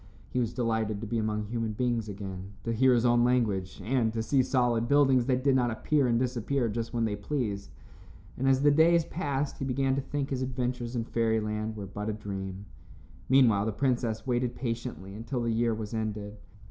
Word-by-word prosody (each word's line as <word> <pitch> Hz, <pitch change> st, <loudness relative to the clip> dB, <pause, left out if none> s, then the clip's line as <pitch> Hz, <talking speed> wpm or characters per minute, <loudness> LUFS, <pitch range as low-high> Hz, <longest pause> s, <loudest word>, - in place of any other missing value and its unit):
He -, -, 0 dB
was 115 Hz, -3 st, 0 dB
delighted 110 Hz, -3 st, -1 dB
to -, -, -4 dB
be 115 Hz, +1 st, -1 dB
among 105 Hz, -1 st, -1 dB
human 115 Hz, 0 st, -2 dB
beings 115 Hz, -1 st, -1 dB
again, 95 Hz, -1 st, -7 dB
to 115 Hz, -, -1 dB
hear 125 Hz, +2 st, +4 dB
his 120 Hz, 0 st, +2 dB
own 120 Hz, 0 st, +4 dB
language 110 Hz, -7 st, +1 dB
and 120 Hz, -1 st, +1 dB
to 115 Hz, -1 st, -1 dB
see 135 Hz, +3 st, +3 dB
solid 120 Hz, -3 st, +1 dB
buildings 135 Hz, -3 st, +4 dB
that 130 Hz, -1 st, +1 dB
did 135 Hz, -1 st, +4 dB
not 125 Hz, -2 st, +2 dB
appear 135 Hz, +5 st, +1 dB
and 120 Hz, -1 st, +2 dB
disappear 125 Hz, +1 st, 0 dB
just 115 Hz, +1 st, -3 dB
when 115 Hz, -2 st, 0 dB
they 105 Hz, -2 st, -1 dB
pleased, 105 Hz, -2 st, -3 dB, 0.7 s
and 135 Hz, +1 st, +1 dB
as 135 Hz, +1 st, +3 dB
the 145 Hz, -, +6 dB
days 165 Hz, +2 st, +5 dB
passed 145 Hz, -6 st, -2 dB
he -, -, -3 dB
began 135 Hz, +1 st, +1 dB
to 140 Hz, -, 0 dB
think 140 Hz, +1 st, -3 dB
his 130 Hz, -1 st, -1 dB
adventures 125 Hz, -1 st, -2 dB
in 115 Hz, -, 0 dB
fairyland 110 Hz, -1 st, -1 dB
were 100 Hz, -, -5 dB
but 105 Hz, +2 st, -5 dB
a -, -, -1 dB
dream. 95 Hz, -2 st, -6 dB, 0.6 s
Meanwhile, 115 Hz, -6 st, +5 dB
the -, -, 0 dB
princess 120 Hz, -2 st, 0 dB
waited 125 Hz, -1 st, 0 dB
patiently 115 Hz, -5 st, -4 dB
until 120 Hz, +4 st, -3 dB
the 115 Hz, -, 0 dB
year 115 Hz, +1 st, +2 dB
was 110 Hz, 0 st, -6 dB
ended. 105 Hz, -2 st, -4 dB
120 Hz, 200 wpm, -29 LUFS, 110-130 Hz, 0.7 s, the